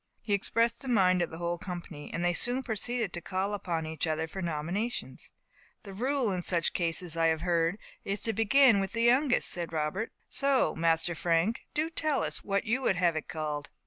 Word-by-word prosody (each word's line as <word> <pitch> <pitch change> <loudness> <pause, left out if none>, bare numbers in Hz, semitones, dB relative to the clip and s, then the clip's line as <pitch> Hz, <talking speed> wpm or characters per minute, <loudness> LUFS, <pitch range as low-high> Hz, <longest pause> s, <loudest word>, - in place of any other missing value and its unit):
He 205 - -1
expressed 230 +3 +1
the 270 - -7
mind 185 -7 +3
of 170 - 0
the 160 - -8
whole 170 0 -2
company, 175 -5 -7
and 175 - -2
they 175 - +2
soon 245 +8 +2
proceeded 230 -2 -2
to 175 - -5
call 190 +3 -2
upon 175 -5 -2
each 160 0 -2
other 160 +1 -1
for 190 +4 -6
nominations. 175 +8 -3 0.5
"The 200 -3 -9
rule 255 +2 0
in 180 -1 -2
such 170 -2 0
cases, 170 0 -1
I 165 0 +3
have 160 -1 +1
heard, 170 +1 +1 0.3
is 200 +1 -2
to 225 - -1
begin 225 0 +5
with 195 0 -2
the 230 0 0
youngest," 255 +2 +4
said 175 -1 -2
Robert. 160 +7 -2 0.2
"So 275 -1 +2
Master 165 +1 +1
Frank, 170 +7 0
do 305 - +2
you 325 - -4
tell 310 -4 0
us - - -3
what 200 0 0
you 245 +5 0
would 200 - +2
have 175 -2 +2
it 155 - -4
called." 155 -3 -4
185 Hz, 210 wpm, -30 LUFS, 165-230 Hz, 0.5 s, begin